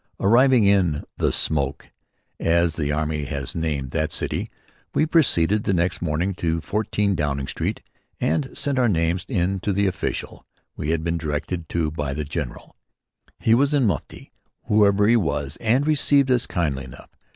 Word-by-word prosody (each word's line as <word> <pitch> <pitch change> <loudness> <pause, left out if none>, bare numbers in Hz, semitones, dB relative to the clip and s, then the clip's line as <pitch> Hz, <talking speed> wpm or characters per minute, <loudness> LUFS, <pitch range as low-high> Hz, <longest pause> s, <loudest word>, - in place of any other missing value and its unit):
Arriving 120 +2 +5
in 90 -7 +2
"The - - +1
Smoke," 70 -3 -1 0.5
as 85 0 +2
the 75 -2 -2
army 75 0 -1
has 70 -2 -5
named 75 -5 -2
that 80 0 -1
city, - - -3 0.5
we - - +3
proceeded 105 - +3
the 95 - +1
next 90 +1 0
morning 85 +4 -1
to 80 -1 0
14 105 +2 -1
Downing 70 -5 -1
Street - - -3 0.4
and 80 - 0
sent 140 -2 0
our 120 -2 +3
names 85 0 0
in 95 -4 0
to 100 - -1
the 100 +1 +1
official 95 - -3 0.3
we 75 - -4
had 80 -1 0
been 85 0 -1
directed 80 +2 -3
to 80 -3 -1
by 75 -3 -3
the 75 0 -3
general. 75 -4 -6 0.6
He 115 - +2
was 140 +5 +3
in 135 -4 +3
mufti, 95 -8 -3 0.3
whoever 105 -1 +3
he 115 - +5
was, 75 -7 -2
and 120 +5 +1
received 140 -3 +3
us 125 -1 +2
kindly 75 -6 -1
enough. 60 - -13
85 Hz, 165 wpm, -23 LUFS, 75-105 Hz, 0.6 s, Arriving